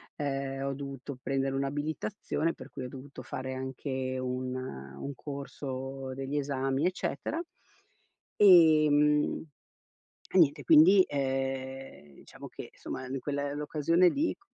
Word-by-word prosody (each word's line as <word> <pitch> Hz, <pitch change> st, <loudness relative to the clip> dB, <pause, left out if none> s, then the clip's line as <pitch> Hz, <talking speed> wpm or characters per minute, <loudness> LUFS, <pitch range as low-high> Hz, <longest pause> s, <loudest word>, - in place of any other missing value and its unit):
ehm, 135 Hz, -1 st, -2 dB
ho 140 Hz, -, -1 dB
dovuto 140 Hz, -1 st, -7 dB
prendere 135 Hz, 0 st, -1 dB
un'abilitazione, 150 Hz, +5 st, -2 dB
per -, -, -11 dB
cui 130 Hz, -, -7 dB
ho 125 Hz, -, -6 dB
dovuto 135 Hz, +1 st, -10 dB
fare 130 Hz, 0 st, -5 dB
anche 130 Hz, 0 st, -3 dB
un 130 Hz, 0 st, -3 dB
un 70 Hz, -, -6 dB
corso, 135 Hz, -2 st, -6 dB
degli 135 Hz, +2 st, -3 dB
esami, 135 Hz, 0 st, 0 dB
eccetera. 180 Hz, -, -2 dB, 1.0 s
Ehm, 155 Hz, -5 st, +6 dB, 0.9 s
e -, -, +2 dB
niente 150 Hz, -5 st, +4 dB
quindi, 170 Hz, +5 st, +8 dB
ehm, 135 Hz, -, -3 dB
diciamo -, -, -12 dB
che -, -, -9 dB
somma 130 Hz, -, -6 dB
in 135 Hz, +1 st, -3 dB
quella 140 Hz, 0 st, -2 dB
è -, -, -4 dB
l'occasione 155 Hz, +4 st, +3 dB
lì 300 Hz, -, 0 dB
c -, -, -30 dB
135 Hz, 130 wpm, -30 LUFS, 130-150 Hz, 1.0 s, quindi